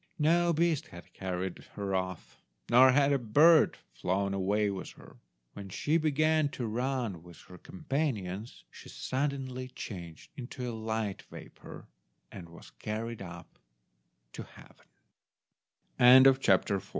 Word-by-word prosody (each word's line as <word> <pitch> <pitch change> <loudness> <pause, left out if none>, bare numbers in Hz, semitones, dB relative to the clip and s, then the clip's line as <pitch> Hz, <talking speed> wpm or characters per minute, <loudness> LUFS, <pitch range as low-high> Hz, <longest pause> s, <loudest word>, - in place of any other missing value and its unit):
No 170 +2 +3
beast 165 -2 0
had 85 - -14
carried 95 -1 -4 0.2
her 100 -1 -4
off, 95 -2 -4 0.4
nor 130 +2 +7
had 140 +1 +3
a 140 - +1
bird 150 +8 +4 0.2
flown 100 +7 -1
away 100 +2 0
with 95 -2 -6
her. - - -16 0.4
When 100 -1 -9
she 150 - 0
began 155 -1 +1
to 120 - -3
run 120 -5 -3
with 85 -1 -15
her 90 -1 -14
companions 135 - -4
she - - -13
suddenly 130 -2 -3
changed 85 -9 -9
into 125 0 -7
a 120 - -4
light 110 -2 -3
vapour, - - -12 0.4
and 85 -3 -10
was 85 - -14
carried 110 +1 -5
up 85 -2 -11 0.7
to - - -8
heave - - -18
115 Hz, 125 wpm, -30 LUFS, 95-140 Hz, 0.7 s, nor